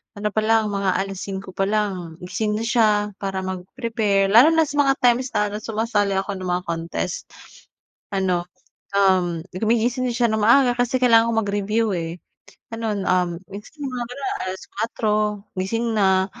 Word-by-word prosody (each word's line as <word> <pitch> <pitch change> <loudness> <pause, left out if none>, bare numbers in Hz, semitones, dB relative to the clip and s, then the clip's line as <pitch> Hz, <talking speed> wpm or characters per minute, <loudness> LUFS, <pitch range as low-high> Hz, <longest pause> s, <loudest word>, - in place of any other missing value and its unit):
ano 210 +1 -2
palang, 215 0 +2
mga 200 -1 0
5:00 195 0 -4
palang, 195 -3 -1
gising 210 +4 -2
na 220 - -2
siya 225 -1 +3 0.3
para 195 -1 -3
mag-prepare, 195 +1 -1
lalo 235 +7 +8
na 325 0 +4
sa 290 -1 -3
mga 275 -1 +4
times 245 +1 +4
na 210 0 0
sumasali 215 -2 0
ako 195 0 -2
ng 185 - -5
mga 180 - -3
contest. 170 +2 -3 0.9
Ano, 180 -2 0 0.5
um, 185 -4 +3
gumigising 235 +5 +1
na - - -2
siya 240 0 +3
ng 220 - 0
maaga 245 +4 +5
kasi 245 +1 +1
kailangan 230 -2 +6
ko - - -1
mag-review, 205 +2 0
eh, 165 0 -4 0.6
gano'n. 220 -3 -2
Um, 180 -1 +2 0.2
basta 210 +10 -10
yung 280 - -3
mga 245 -1 -3
gano'n, 270 +1 -3 0.2
4:00 215 +3 -3 0.4
gising 225 +5 -1
na 190 -2 +3
210 Hz, 155 wpm, -22 LUFS, 190-230 Hz, 0.9 s, lalo